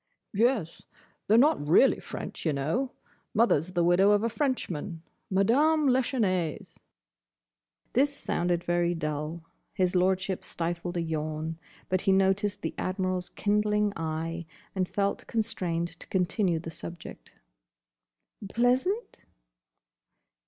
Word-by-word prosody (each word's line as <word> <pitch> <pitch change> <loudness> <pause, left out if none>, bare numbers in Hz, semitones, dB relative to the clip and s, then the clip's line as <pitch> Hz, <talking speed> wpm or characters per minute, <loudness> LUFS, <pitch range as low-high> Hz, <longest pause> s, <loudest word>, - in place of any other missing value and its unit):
"Yes. 220 -5 +1 0.5
They're 220 - +5
not 275 - +4
really 165 - +5
French, - - -7
y' - - +3
know. 160 - -1 0.4
Mother's 185 -6 +3
the 175 -1 +2
widow 175 +3 +5
of 205 +1 +2
a 230 - +1
Frenchman. 195 - -2 0.3
Madame 280 +11 +3
Lachesnais." 220 - 0 1.2
This 280 +3 +3
sounded 175 -10 -1
very 175 0 +1
dull. 155 +1 -3 0.3
His 185 -1 +1
Lordship 190 +1 +1
stifled 175 +1 -3
a 170 - 0
yawn, 155 0 -3 0.3
but 185 -1 +1
he 195 - +2
noticed 195 +1 +2
the - - -2
Admiral's 185 -1 -1
kindling 210 0 +1
eye, 165 +1 -3 0.3
and 185 -2 -1
felt 200 0 -1
constrained 185 -7 -1
to - - -11
continue 180 -1 +1
the 165 0 -6
subject. 170 +1 -9 1.2
"Pleasant?" 255 - +1
185 Hz, 115 wpm, -28 LUFS, 170-215 Hz, 1.2 s, They're